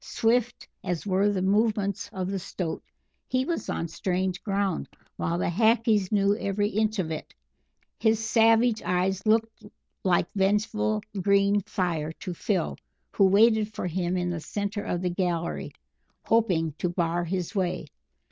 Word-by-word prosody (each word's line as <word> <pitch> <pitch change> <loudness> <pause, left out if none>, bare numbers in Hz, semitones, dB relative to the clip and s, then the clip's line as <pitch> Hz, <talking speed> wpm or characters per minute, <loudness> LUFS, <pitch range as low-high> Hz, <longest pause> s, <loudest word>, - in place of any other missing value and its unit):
Swift 240 - 0 0.2
as 175 0 -3
were 195 +1 +2
the 190 -2 -1
movements 205 0 +1
of 185 -1 -3
the 195 - -2
Stoat, 175 -2 -4 0.5
he 255 +1 0
was 340 - -3
on 165 - -2
strange 185 +2 -2
ground, 200 -3 -1 0.3
while 170 +1 -1
the - - -1
Hackees 220 +1 +2
knew 200 -1 +3
every 205 -1 0
inch 215 +1 0
of 170 -4 -1
it. 155 - -6 0.6
His 220 -1 +3
savage 225 +1 +3
eyes 185 +1 0
looked 225 0 +1 0.4
like 175 -2 +3
vengeful 190 - +1 0.2
green 200 +1 +3
fire 175 -7 -1
to 180 - -6
Phil, 180 0 -1 0.3
who 200 - +4
waited 215 +2 +4
for - - -3
him 180 +1 -1
in 180 0 -1
the 175 - -3
centre 205 +3 -3
of 175 +1 -2
the 180 - 0
gallery, 175 -2 -2 0.5
hoping 180 -9 +2
to 180 - 0
bar 175 0 0
his 180 +1 -3
way. 180 -5 -1
195 Hz, 150 wpm, -27 LUFS, 180-215 Hz, 0.6 s, who